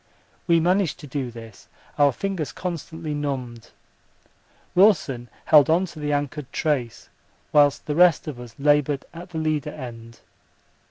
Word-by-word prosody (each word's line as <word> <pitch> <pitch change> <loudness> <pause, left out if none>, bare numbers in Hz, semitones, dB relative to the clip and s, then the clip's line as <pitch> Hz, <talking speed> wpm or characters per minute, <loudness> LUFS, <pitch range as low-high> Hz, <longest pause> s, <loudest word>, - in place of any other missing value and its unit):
We 170 -1 +5
managed 180 -1 +1
to - - -9
do 135 -1 -3
this, 115 -3 -12 0.3
our 145 -1 +6
fingers 175 -1 -3
constantly 165 -3 -5
numbed. 130 -6 -4 1.0
Wilson 150 - +3 0.2
held 150 -1 +6
on 170 +4 +3
to 170 -3 -11
the 150 0 -2
anchored 145 -1 -3
trace 135 -7 -2 0.4
whilst 145 -2 +4
the 150 - -2
rest 175 -1 +4
of 140 -5 -6
us 120 -2 -11
laboured 145 -1 +2
at 175 +2 -10
the 170 - -7
leader 155 -2 -1
end. 115 -5 -10
145 Hz, 145 wpm, -24 LUFS, 130-165 Hz, 1.0 s, our